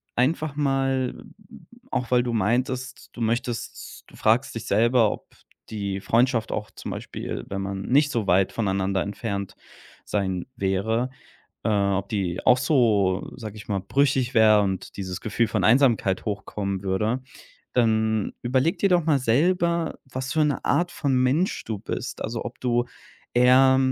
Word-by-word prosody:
einfach 145 Hz, +3 st, 0 dB
mal 135 Hz, -3 st, +1 dB
m -, -, -16 dB, 0.5 s
auch, 125 Hz, -, -2 dB
weil 120 Hz, -1 st, +4 dB
du 120 Hz, -, -2 dB
meintest, 125 Hz, +4 st, -1 dB
du -, -, -11 dB
möchtest 115 Hz, +1 st, -3 dB
du -, -, -17 dB
fragst -, -, +1 dB
dich -, -, -5 dB
selber, 115 Hz, +1 st, +3 dB
ob -, -, -8 dB, 0.4 s
die 100 Hz, -2 st, -3 dB
Freundschaft 115 Hz, +1 st, +1 dB
auch 105 Hz, -1 st, -4 dB
zum -, -, -7 dB
Beispiel, -, -, -5 dB
wenn 95 Hz, 0 st, -3 dB
man 95 Hz, 0 st, -4 dB
nicht 140 Hz, +7 st, +3 dB
so 115 Hz, -4 st, -1 dB
weit 95 Hz, 0 st, +2 dB
voneinander 95 Hz, -3 st, 0 dB
entfernt 100 Hz, -1 st, -4 dB, 0.5 s
sein 95 Hz, -3 st, -2 dB
wäre 110 Hz, +5 st, 0 dB, 0.6 s
äh, -, -, +2 dB
ob 100 Hz, -2 st, +1 dB
die 95 Hz, -5 st, -2 dB
auch 125 Hz, -1 st, +6 dB
so, 110 Hz, -9 st, +2 dB
sage 110 Hz, -4 st, -8 dB
ich 105 Hz, -, -11 dB
mal, 100 Hz, -3 st, -1 dB
brüchig 135 Hz, +3 st, +1 dB
wäre 110 Hz, -2 st, +6 dB
und 95 Hz, -2 st, -3 dB
dieses 95 Hz, -2 st, -4 dB
Gefühl 115 Hz, +1 st, 0 dB
von 105 Hz, -3 st, -1 dB
Einsamkeit 115 Hz, -5 st, +3 dB
hochkommen 100 Hz, -2 st, -3 dB
würde. 105 Hz, +6 st, 0 dB, 0.5 s
Dann 110 Hz, -3 st, +1 dB
überlege 130 Hz, +7 st, +1 dB
dir 200 Hz, -, +2 dB
doch 175 Hz, -2 st, +3 dB
mal 150 Hz, -4 st, +3 dB
selber, 170 Hz, +7 st, +1 dB
was 130 Hz, 0 st, -5 dB
für 155 Hz, -1 st, +3 dB
'ne 145 Hz, -, -1 dB
Art 175 Hz, +4 st, +1 dB
von 140 Hz, -3 st, -1 dB
Mensch 130 Hz, +9 st, +1 dB
du 110 Hz, -2 st, -3 dB
bist, 120 Hz, +3 st, -5 dB
also, 115 Hz, +1 st, -4 dB
ob 120 Hz, -, -7 dB
du 120 Hz, -1 st, +1 dB, 0.5 s
eher 130 Hz, +2 st, +6 dB
115 Hz, 160 wpm, -24 LUFS, 100-130 Hz, 0.6 s, auch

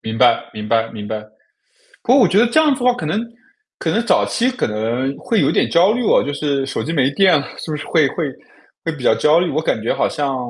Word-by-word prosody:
明 110 Hz, 0 st, -5 dB
白 125 Hz, -, +3 dB
明 105 Hz, 0 st, -7 dB
白 115 Hz, -1 st, +1 dB
明 105 Hz, -2 st, -8 dB
白。 110 Hz, 0 st, -5 dB, 0.8 s
可 250 Hz, -, +3 dB
我 265 Hz, -, +6 dB
觉 200 Hz, -, +2 dB
得 240 Hz, -, +5 dB
这 310 Hz, +6 st, +3 dB
样 305 Hz, -2 st, +3 dB
子 260 Hz, -, -9 dB
的 250 Hz, -, +4 dB
话 245 Hz, -, -2 dB
可 155 Hz, -, -5 dB
能 200 Hz, +8 st, -1 dB, 0.6 s
可 -, -, -2 dB
能 235 Hz, -, 0 dB
早 -, -, +2 dB
期 250 Hz, +2 st, 0 dB
可 255 Hz, -, -2 dB
能 120 Hz, +5 st, -2 dB
会 225 Hz, -3 st, 0 dB
有 -, -, +2 dB
一 -, -, -1 dB
点 -, -, +1 dB
焦 180 Hz, +5 st, +4 dB
虑 245 Hz, +1 st, -2 dB
哦， -, -, +3 dB
就 145 Hz, -, -3 dB
是 140 Hz, -2 st, -1 dB
手 -, -, -3 dB
机 165 Hz, -, -4 dB
没 135 Hz, -3 st, +1 dB
电 185 Hz, -2 st, +4 dB
了 140 Hz, -, -5 dB
是 160 Hz, -, -7 dB
不 150 Hz, -, -2 dB
是 150 Hz, -, -7 dB
会 155 Hz, -4 st, +2 dB
会 150 Hz, -1 st, -3 dB, 0.5 s
会 165 Hz, -, -2 dB
比 140 Hz, -5 st, -10 dB
较 -, -, +3 dB
焦 155 Hz, +3 st, +3 dB
虑？ 180 Hz, -, -1 dB
我 155 Hz, -, -1 dB
感 110 Hz, -, -1 dB
觉 115 Hz, -, -1 dB
好 -, -, 0 dB
像 140 Hz, -2 st, -2 dB
150 Hz, 295 characters per minute, -18 LUFS, 130-205 Hz, 0.8 s, 我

